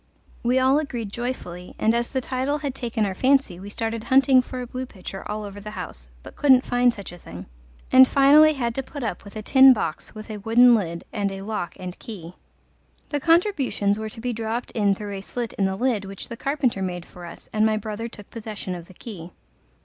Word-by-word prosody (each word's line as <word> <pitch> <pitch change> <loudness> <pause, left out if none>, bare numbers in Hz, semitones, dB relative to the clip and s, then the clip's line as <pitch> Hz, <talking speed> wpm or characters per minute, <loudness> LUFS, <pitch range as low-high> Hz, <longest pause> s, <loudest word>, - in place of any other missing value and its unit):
We 245 +2 +2
all 260 +3 +4
agreed 240 -9 -4
joyfully, 200 -7 -5
and 220 - +2
as 235 0 0
the 260 - -1
title 260 +3 -1
had 285 -3 -4
taken 235 -4 -1
our 195 - -2
fancy 260 -5 +2
we 200 +2 -8
started 225 +1 -3
hunting 265 -1 +5
for 255 0 -7
a 250 - -4
blue 255 +1 -5
pitcher 195 -3 -8
all 215 0 -3
over 205 0 -8
the 210 - -7
house, 65 - -7 0.2
but - - -12
couldn't 265 -3 +5
find 245 0 +3
such 200 -6 -8
a 175 - -12
thing, 90 - -10 0.5
and 260 0 +9
finally 295 +3 +6
had 240 -5 -2
to 270 - -2
put 275 +1 -8
up 210 -6 -3
with 200 +1 -13
a 215 - -5
tin 265 +3 +8
box 165 -6 -4
with 215 +1 -8
a 215 - -5
wooden 240 +4 +6
lid 170 -6 -1
and 200 -1 -1
a 195 0 -6
lock 210 -4 -4
and 180 -1 -7
key. 180 -6 -9 0.8
The 290 - -1
contributions 295 - +2
were 220 0 -4
to 220 - -10
be 245 0 -2
dropped 225 +2 -3
in 205 -4 +2
through 205 0 -6
a - - -6
slit 235 +3 -5
in 195 - 0
the 190 0 0
lid 225 -2 0
which 195 0 -8
the 235 - -5
carpenter 265 -5 -1
made 180 -2 -3
for 180 - -13
us, 170 - -10
and 215 0 +2
my 220 0 +3
brother 215 +2 -4
took 205 -3 -12
possession 215 -4 -6
of 175 -1 -8
the 185 - -16
key. 180 -7 -9
225 Hz, 225 wpm, -24 LUFS, 195-255 Hz, 0.8 s, and